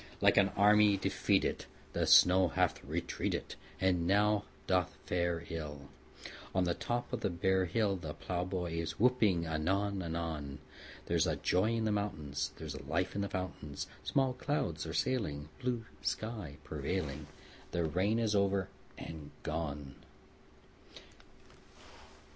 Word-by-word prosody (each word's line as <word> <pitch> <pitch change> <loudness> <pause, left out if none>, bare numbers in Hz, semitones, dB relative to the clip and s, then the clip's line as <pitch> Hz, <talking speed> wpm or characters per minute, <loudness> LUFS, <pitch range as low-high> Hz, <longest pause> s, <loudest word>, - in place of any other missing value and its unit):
Like - - +5
an 95 - +6
army 105 0 +6
defeated 95 - +1 0.3
The - - +1
snow 90 0 +7
hath 80 - 0
retreated, - - -2 0.3
And 90 -3 +2
now 105 +2 +3 0.2
doth 90 -5 +1
fare 85 -1 0
ill 75 -3 -6 0.7
On 95 - +4
the 85 -1 +1
top 120 +7 -3
of 125 - 0
the - - +1
bare 95 +2 +2
hill; 100 +1 +1
The 80 -4 -6
plowboy 90 -2 -2
is 85 - -4
whooping 110 -8 +3
anon 95 +5 0
anon: 80 -5 -3 0.5
There's 85 +1 +2 0.2
joy 100 +6 +3
in 115 -1 0
the 110 - +2
mountains; 75 -8 -2
There's 80 -3 -6
life 85 +7 -1
in 100 - -1
the 100 - -2
fountains; 75 -6 -4 0.2
Small 135 -2 +2
clouds 90 - -2
are 80 - -4
sailing, 75 - -1
Blue 120 -2 -1 0.2
sky 105 -10 -3
prevailing; 75 0 -3 0.4
The 85 - 0
rain 95 +7 +1
is 115 -2 +1
over 100 -1 +2 0.3
and 80 -3 -8
gone! 75 -3 -3
90 Hz, 130 wpm, -33 LUFS, 80-105 Hz, 0.7 s, snow